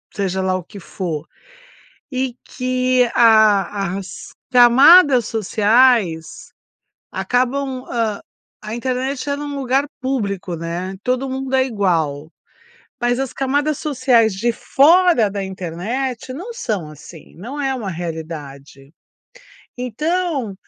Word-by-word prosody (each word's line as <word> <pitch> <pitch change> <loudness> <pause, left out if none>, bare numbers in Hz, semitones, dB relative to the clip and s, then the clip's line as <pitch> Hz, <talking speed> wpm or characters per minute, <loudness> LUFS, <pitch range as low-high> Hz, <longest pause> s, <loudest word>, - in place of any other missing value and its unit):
seja 190 -2 -1
lá 185 0 0
o 185 - -7
que 200 +4 -12
for, 170 -4 -5 0.8
e 255 -1 -2
que 255 -1 +1
a 205 -4 +4
as 190 - -10 0.2
camadas 260 - +7
sociais 215 -5 +1 0.6
acabam, 255 +1 -1
hã, 225 -3 -1 0.4
a 215 +1 -5
internet 260 +3 -3
ela 285 +1 -2
é 295 - -5
um 285 - -5
lugar 270 +2 +1
público, 200 -9 -3
né, 175 +3 -5
todo 255 +2 -1
mundo 265 0 -4
é 260 0 +4
igual, 165 - -1 0.7
mas 245 0 +1
as 270 -2 -3
camadas 285 +2 -1
sociais 255 -6 +2
de 235 +5 0
fora 320 - +4
da 200 0 -4
internet 210 +9 -4
não 365 - -7
são 205 - -3
assim, 155 +2 -14
não 255 - -7
é 270 -1 -1
uma 220 -6 -4
realidade. 155 -5 -8 0.9
Então, 280 - -2
235 Hz, 120 wpm, -19 LUFS, 190-265 Hz, 0.9 s, camadas